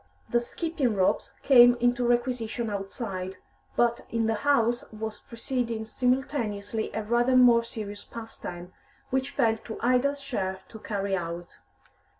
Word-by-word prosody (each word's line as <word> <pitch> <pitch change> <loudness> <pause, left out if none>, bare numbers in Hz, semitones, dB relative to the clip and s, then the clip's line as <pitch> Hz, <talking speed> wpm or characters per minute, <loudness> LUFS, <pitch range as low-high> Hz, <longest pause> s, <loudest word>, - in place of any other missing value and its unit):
The 240 - +4
skipping 270 -1 -1
ropes 185 -1 +1
came 245 -3 +8
into 245 0 +1
requisition 240 -2 0
outside, 195 -2 -4 0.4
but 235 0 +2
in 230 -1 0
the 225 - +2
house 240 -1 +2
was 220 0 -5
proceeding 235 -1 -3
simultaneously 225 -4 -1
a 220 - -3
rather 240 +4 +2
more 240 -2 +7
serious 210 -3 -6
pastime, 180 -6 -8 0.4
which 265 +1 0
fell 225 -6 +2
to 225 0 -8
Ida's 255 +4 +2
share 190 -9 -3
to 220 - -10
carry 200 -2 -2
out. 170 -1 -5
230 Hz, 135 wpm, -27 LUFS, 210-245 Hz, 0.4 s, came